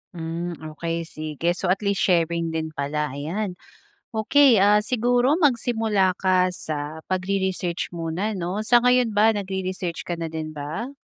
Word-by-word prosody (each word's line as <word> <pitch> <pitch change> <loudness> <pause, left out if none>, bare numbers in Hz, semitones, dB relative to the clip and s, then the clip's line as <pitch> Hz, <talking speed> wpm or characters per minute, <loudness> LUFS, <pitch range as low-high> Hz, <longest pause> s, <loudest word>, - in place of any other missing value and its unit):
Mm, 170 +1 -4 0.2
okey 165 +1 -3
sige. 155 +2 -2
So 180 - -3
at 195 +3 +1
least 200 -1 +1
sharing 170 -2 +2
din 160 -1 -3
pala, 145 0 -2
ayan. 180 +8 -3 0.6
Okey 250 +3 +4
ah, 205 +2 +5
siguro 245 +5 +2
magsimula 225 - +2
ka 185 -1 +3
sa, 155 -3 -5
pagre-research 185 -2 -2
muna 170 +6 -2
'no. 190 +3 -3
Sa 240 +1 +5
ngayon 250 -2 +3
ba, 210 +2 +5
nagre-research 185 -3 -3
ka 175 - -4
na 165 - -3
din 160 -1 -5
ba? 155 - -6
185 Hz, 145 wpm, -24 LUFS, 165-215 Hz, 0.6 s, ah